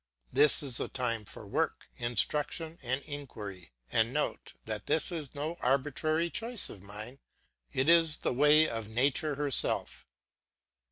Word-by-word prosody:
This 150 0 +6
is 130 -4 +2
the - - -1
time 115 -4 -3
for - - -6
work, - - -2
instruction, 150 - 0
and 130 +2 -2
inquiry. 105 - -8 0.2
And 115 +1 +2
note 150 +3 -3
that - - -3
this 160 - +2
is 155 -5 -6
no 155 +4 -4
arbitrary 150 +5 0
choice 230 0 +2
of 100 - -12
mine, 105 +6 -9 0.5
it 130 +2 0
is 165 -2 +5
the - - -1
way 150 +4 +5
of 115 -2 -5
nature 140 +5 +1
herself. 145 -2 0
140 Hz, 145 wpm, -30 LUFS, 120-155 Hz, 0.5 s, This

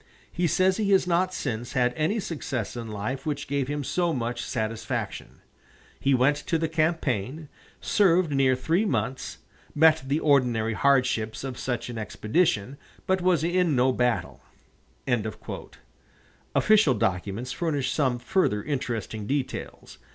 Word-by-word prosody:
He 175 0 0
says 185 +3 +2
he 210 -2 0
has 190 - +4
not 180 +1 +1
since 120 -9 -4
had 125 -2 +2
any 160 +8 0
success 135 - -4
in 120 -1 -5
life 110 +6 -4
which 150 -2 -3
gave 140 -2 -1
him 145 0 -3
so 175 +5 0
much 120 -2 -2
satisfaction. 110 -1 -4 0.6
He 135 0 +3
went 135 +4 +3
to 165 - -1
the 160 0 0
campaign, 155 - -1 0.3
served 185 -5 +3
near 135 -2 +3
three 165 +10 +1
months, 130 - -2 0.4
met 160 +1 +5
the 145 +3 +1
ordinary 125 -7 +2
hardships 125 -4 +1
of 130 -2 -5
such 120 -2 -3
an 120 -2 -5
expedition, 110 - 0 0.3
but 190 0 +1
was 175 -4 +2
in 175 -2 +2
no 130 +1 +3
battle." 125 -1 -1 2.1
Official 210 -11 +4
documents 100 +5 -2
furnish 150 -5 -1
some 130 -5 +1
further 120 - 0
interesting 115 -7 -3
details. 140 -1 -4
135 Hz, 135 wpm, -26 LUFS, 120-165 Hz, 2.1 s, met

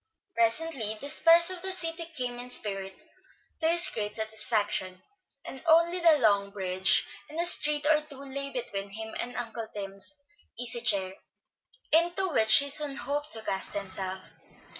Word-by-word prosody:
Presently 230 -2 0
the 285 +4 -4
spires 335 +3 +5
of 365 -1 -5
the 380 +1 0
city 335 -2 -2
came 245 -3 -3
in 245 +1 -8
sight, 195 -5 -4 0.6
to 320 - +1
his 345 +1 +5
great 210 -1 -5
satisfaction, 215 -4 0 0.5
and 265 - -9
only 335 +2 +4
the 330 -3 +5
long 205 -5 +2
bridge 190 -2 +2 0.2
and 310 +2 -7
a 340 - +1
street 300 -3 +2
or 305 0 +4
two 280 - -11
lay 275 +1 -4
between 200 -6 -5
him 220 +2 -8
and 245 - -5
Uncle 230 -2 -5
Tim's 200 +8 -3 0.4
easy 235 0 0
chair, 195 -4 +1 0.8
into 345 +4 +2
which 220 -8 +5
he 280 0 +1
soon 290 -1 +3
hoped 285 +4 -4
to 220 -1 -6
cast 195 -2 -3
himself. 190 -1 -5
245 Hz, 160 wpm, -28 LUFS, 205-310 Hz, 0.8 s, spires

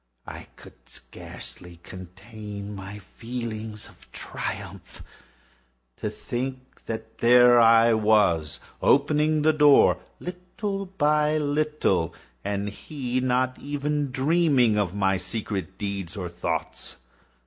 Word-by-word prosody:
I - - -9
could - - -17
scarcely 90 -1 -11
contain 100 +3 -9
my 100 +1 -8
feelings 110 0 -6
of - - -19
triumph. - - -7 0.9
To - - -3
think 130 +1 -6
that 110 0 -6
there 120 0 +6
I 115 0 +6
was, 105 -8 +2 0.2
opening 150 +2 +3
the 155 +1 +4
door, 150 -2 +5 0.2
little 195 +3 -5
by 150 -4 +2
little, 145 - 0 0.3
and 100 0 -2
he 130 +3 -4
not 130 0 0
even 145 0 -2
to - - -10
dream 135 -4 +3
of 100 -3 0
my 95 -1 +2
secret 95 0 -4
deeds 100 -3 -4
or 90 -3 -4
thoughts. 85 -2 -4
115 Hz, 110 wpm, -25 LUFS, 100-145 Hz, 0.9 s, there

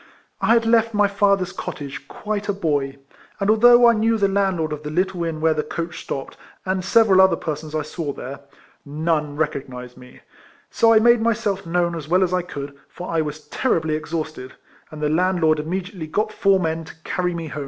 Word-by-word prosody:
I 230 - +4
had 230 -1 +2
left 225 -1 +3
my 205 0 +4
father's 200 -2 +1
cottage 140 -4 -7
quite 210 -1 -4
a - - +2
boy, 145 -7 -1 0.4
and 200 +1 +2
although 240 +2 +7
I 235 - +6
knew 225 +1 +1
the 200 -2 +2
landlord 190 -6 0
of 150 - -6
the 150 - -6
little 180 +2 -1
inn 160 -2 -3
where 160 0 +3
the 155 - -1
coached 165 +2 -5
stopped, 135 - -6 0.3
and 190 0 -1
several 195 -2 +5
other 190 -2 +5
persons 155 -1 -5
I 155 - 0
saw 155 0 -4
there, 140 0 -8 0.4
none 150 0 -1
recognised 130 -5 -4
me; 125 0 -15 0.5
so 230 - +4
I 225 - +6
made 235 +1 +5
myself 210 -5 -1
known 170 0 +1
as 160 -3 -6
well 180 +2 +4
as 180 -1 -1
I 180 - +2
could, 140 -5 -7
for 180 - -7
I 165 -1 +1
was 150 0 -6
terribly 160 -11 0
exhausted, 155 -4 -4 0.4
and 155 -1 -8
the - - +2
landlord 165 -1 +2
immediately 180 +2 -4
got 210 +7 -1
four 195 -1 +3
men 165 -2 -2
to - - -12
carry 180 -1 -2
me 165 -2 -5
home. 150 - -6
170 Hz, 200 wpm, -22 LUFS, 155-200 Hz, 0.5 s, although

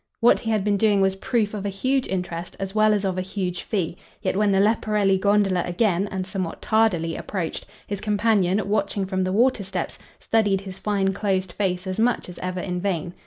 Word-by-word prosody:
What 235 - +5
he 225 - -4
had 215 -3 +1
been 205 0 +2
doing 205 -1 +3
was 190 0 +2
proof 220 0 0
of 205 -2 -4
a 205 - -1
huge 255 +7 0
interest 175 -2 -4
as 195 0 -4
well 215 0 +4
as 205 -1 +1
of 185 -1 -1
a - - 0
huge 185 -2 -3
fee; 180 -5 -2 0.3
yet - - 0
when 205 0 +3
the 195 - +3
Leporelli 210 -2 +2
gondola 200 -2 +3
again, 190 +1 +1
and 190 -1 -3
somewhat 185 -3 -4
tardily, 190 -7 +1
approached, 180 -5 -4 0.2
his 200 -1 -4
companion, 210 -2 +2
watching 200 -1 0
from 190 -1 -1
the 185 - -1
water 235 +1 +2
steps, 195 - -4 0.2
studied 205 -4 +1
his 190 -1 -8
fine 195 -2 0
closed 190 -2 -1
face 180 -1 -1
as 185 +2 -3
much 235 -4 +1
as 180 - -10
ever 185 0 -3
in 180 -1 -3
vain. 180 -3 -2
195 Hz, 210 wpm, -24 LUFS, 185-210 Hz, 0.3 s, What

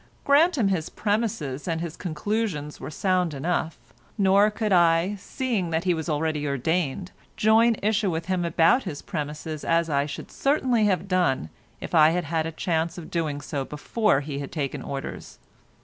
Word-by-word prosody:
Grant 305 +4 +4
him 215 -6 +2
his 170 -5 -1
premises 205 - -2
and 165 -2 -1
his 165 -1 -5
conclusions 180 -3 -3
were - - -6
sound 180 -1 0
enough, 165 +3 -1 0.4
nor 200 +1 +5
could 210 -1 -1
I, 170 +2 +4
seeing 220 -4 -2
that 165 0 -1
he 180 -1 +2
was 160 -1 -4
already 150 -1 -1
ordained, 160 +5 -1 0.3
join 225 +2 +4
issue 210 -1 +2
with 165 -1 -3
him 185 -1 0
about 170 - +4
his 150 -6 -6
premises 150 +1 -5
as 165 -1 +1
I 140 0 +1
should 145 - -8
certainly 260 -6 +2
have 195 -1 +1
done 175 - +1 0.3
if - - -8
I 155 -2 +7
had 175 +2 0
had 160 +1 -1
a - - -4
chance 165 +1 -1
of 170 - -9
doing 155 -4 -2
so 140 -1 -3
before 150 - 0
he 140 -1 -5
had 140 - -6
taken 145 -5 -3
orders. 135 0 -6
170 Hz, 175 wpm, -25 LUFS, 150-200 Hz, 0.4 s, I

